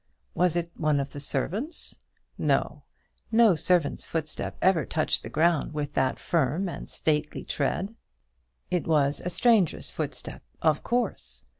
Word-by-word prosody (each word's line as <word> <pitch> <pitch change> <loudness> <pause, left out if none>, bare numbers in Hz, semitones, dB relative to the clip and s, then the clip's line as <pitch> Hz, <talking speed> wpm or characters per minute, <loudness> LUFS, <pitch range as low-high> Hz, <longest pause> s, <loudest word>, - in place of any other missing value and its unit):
Was 180 -2 +2
it 170 -1 -2
one 150 -2 +1
of 140 0 -3
the 145 - -7
servants? 190 - 0 0.3
No; - - 0 0.5
no 225 -3 +6
servant's 170 -2 +2
foot 160 -1 -2 0.2
ever 185 -4 +3
touched 155 - 0
the - - -7
ground 160 -1 +1
with 145 -1 -3
that 130 -1 +1
firm 165 +3 0
and 175 - -7
stately 150 -1 -1
tread. 185 +8 -2 0.8
It 180 -1 0
was 145 -3 +2
a 180 - -1
stranger's 215 -3 +2
footstep, - - -5 0.2
of 155 -2 +2
course. 245 0 -2
160 Hz, 140 wpm, -27 LUFS, 150-180 Hz, 0.8 s, no